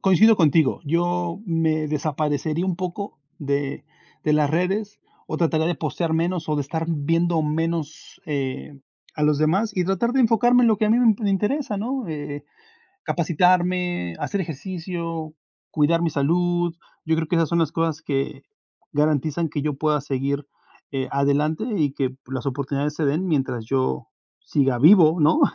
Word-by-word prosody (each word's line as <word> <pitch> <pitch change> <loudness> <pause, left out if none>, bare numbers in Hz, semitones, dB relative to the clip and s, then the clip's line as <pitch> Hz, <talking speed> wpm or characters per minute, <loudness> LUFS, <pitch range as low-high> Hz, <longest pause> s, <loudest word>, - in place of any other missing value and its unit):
coincido 205 +4 +5
contigo. 160 -3 +3
Yo 175 +3 -1
me 160 -2 0
desaparecería 150 +2 -1
un 185 -2 -1
poco 185 +1 -5 0.2
de 140 0 -2 0.4
de 150 - +2
las 150 -1 +3
redes, 195 +6 -1 0.3
o - - -3
trataré 160 -1 +1
de 175 -1 0
postear 160 +3 -2
menos, 165 0 -1
o 150 - +1
de 145 - 0
estar 160 +4 -3
viendo 165 +2 +1
menos, 155 0 -3
eh, 140 -1 -4 0.4
a 150 - -4
los 150 -1 +3
demás, 185 +9 +2
y 180 - +2
tratar 195 +6 0
de 270 - +1
enfocarme 240 +1 +4
en - - +5
lo 215 -3 +2
que 215 - +2
a - - +2
mí 230 - +4
me 245 - +4
m 205 -2 -1
interesa, 210 +5 0
¿no? 245 +1 -3
Eh, 145 -2 -5 0.6
capacitarme, 175 - +1
hacer 200 - -2
ejercicio, 165 0 -5 0.4
cuidar 160 +3 +2
mi 165 - +1
salud. 175 +4 +1 0.3
Yo 160 0 +2
creo 160 0 -1
que 170 - +1
esas 165 -2 +2
son 170 - +1
las 155 -2 0
cosas 165 -2 -1
que 135 -1 -2 0.5
garantizan 155 +2 +1
que 145 -1 -3
yo 150 -2 -1
pueda 150 -1 +1
seguir, 140 0 -2 0.5
eh, 135 -1 -2
adelante 145 +6 +1
y 145 -3 +1
que 130 -2 -2
las 130 0 -5
oportunidades 140 +2 -2
se 155 - -2
den, 155 +7 0
mientras 135 -8 -1
yo 130 - -1 0.3
siga 135 -3 +1
vivo, 165 +2 +6
¿no? 155 - +4
160 Hz, 165 wpm, -23 LUFS, 145-180 Hz, 0.6 s, vivo